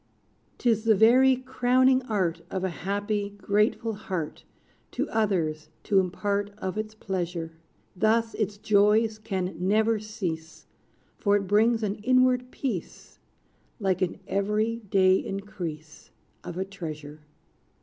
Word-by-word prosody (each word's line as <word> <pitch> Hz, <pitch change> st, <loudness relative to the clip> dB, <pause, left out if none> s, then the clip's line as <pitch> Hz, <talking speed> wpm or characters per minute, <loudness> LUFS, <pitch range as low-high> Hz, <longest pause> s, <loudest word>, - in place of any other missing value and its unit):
'Tis 225 Hz, -3 st, +1 dB
the 220 Hz, -1 st, +5 dB
very 255 Hz, +5 st, +6 dB
crowning 255 Hz, 0 st, +2 dB
art 185 Hz, -6 st, 0 dB
Of 190 Hz, -1 st, -3 dB
a 190 Hz, -, 0 dB
happy, 205 Hz, +3 st, -2 dB
grateful 210 Hz, +3 st, +1 dB
heart 185 Hz, -7 st, -5 dB, 0.5 s
To -, -, -1 dB
others 175 Hz, -9 st, 0 dB
to 200 Hz, -2 st, +3 dB
impart 200 Hz, +2 st, -1 dB
Of 190 Hz, -2 st, -4 dB
its 215 Hz, 0 st, -4 dB
pleasure. 175 Hz, -5 st, -3 dB, 0.4 s
Thus 225 Hz, +3 st, +2 dB
its 205 Hz, -1 st, -2 dB
joys 215 Hz, +2 st, +3 dB
can 190 Hz, -3 st, -3 dB
never 215 Hz, +4 st, +2 dB
cease, 170 Hz, -7 st, -5 dB, 0.5 s
For 205 Hz, -2 st, +3 dB
it 200 Hz, -1 st, 0 dB
brings 220 Hz, +4 st, +3 dB
an 205 Hz, 0 st, -1 dB
inward 255 Hz, +2 st, +3 dB
peace, 235 Hz, -, -5 dB, 0.6 s
Like 190 Hz, -3 st, 0 dB
an 185 Hz, -, -1 dB
every 210 Hz, +3 st, 0 dB
day 190 Hz, -3 st, +3 dB
increase 175 Hz, -6 st, -7 dB, 0.3 s
Of 175 Hz, -, -7 dB
a 190 Hz, -, -1 dB
treasure. 155 Hz, -6 st, -8 dB
205 Hz, 125 wpm, -27 LUFS, 185-220 Hz, 0.6 s, very